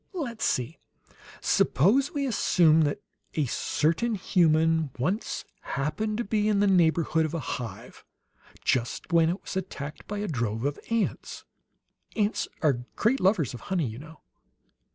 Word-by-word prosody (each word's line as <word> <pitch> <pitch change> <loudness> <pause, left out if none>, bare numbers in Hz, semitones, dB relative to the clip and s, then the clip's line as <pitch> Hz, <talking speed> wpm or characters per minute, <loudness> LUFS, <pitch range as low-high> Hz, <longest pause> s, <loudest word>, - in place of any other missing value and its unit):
"Let's 255 -11 -3
see. 130 +5 -1 0.6
Suppose 235 - +3
we 285 -4 -1
assume 170 - +4
that 145 - -3 0.3
a 155 - +1
certain 165 - 0
human 160 -4 +2
once 180 - -2 0.2
happened 155 +11 -2
to 240 - -1
be 210 0 0
in 205 -2 +2
the 205 - +4
neighborhood 165 -3 +3
of 155 +1 -2
a - - -1
hive, 120 -8 -6 0.6
just 125 +7 -1
when 165 -1 +5
it 180 +4 -2
was - - -8
attacked 155 -6 -5
by 205 - -4
a 205 +1 -2
drove 115 - -2
of 145 0 -1
ants. 230 -1 -2 0.7
Ants 210 -1 0 0.2
are 140 -6 +3 0.2
great 240 +5 +2
lovers 185 - +2
of 120 - -7
honey, 180 -5 +1
you 110 0 -6
know. 160 +1 -13
165 Hz, 150 wpm, -27 LUFS, 145-210 Hz, 0.7 s, when